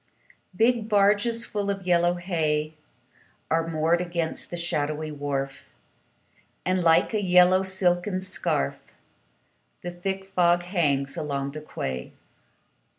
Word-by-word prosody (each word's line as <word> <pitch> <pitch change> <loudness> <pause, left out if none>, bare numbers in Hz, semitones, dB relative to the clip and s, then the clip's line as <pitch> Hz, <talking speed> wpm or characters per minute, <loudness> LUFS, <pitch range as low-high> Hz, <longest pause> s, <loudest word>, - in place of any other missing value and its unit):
Big 225 +1 +2
barges 210 +3 +2
full 205 -2 -3
of 195 -2 -3
yellow 175 0 +3
hay 155 -4 -1 0.8
Are 165 0 +1
moored 165 +2 +1
against 170 -2 -2
the 175 - -5
shadowy 155 -2 -2
wharf, 140 -2 -4 1.0
And, 185 0 +1
like 165 +6 +4
a 215 - +1
yellow 180 0 +5
silken 185 0 +1
scarf, 185 - -1 1.0
The 175 - -4
thick 190 +2 -5
fog 175 -1 +3
hangs 145 -7 0
along 140 -2 -3
the 155 +1 -7
quay. 65 - -5
175 Hz, 115 wpm, -25 LUFS, 155-190 Hz, 1.0 s, yellow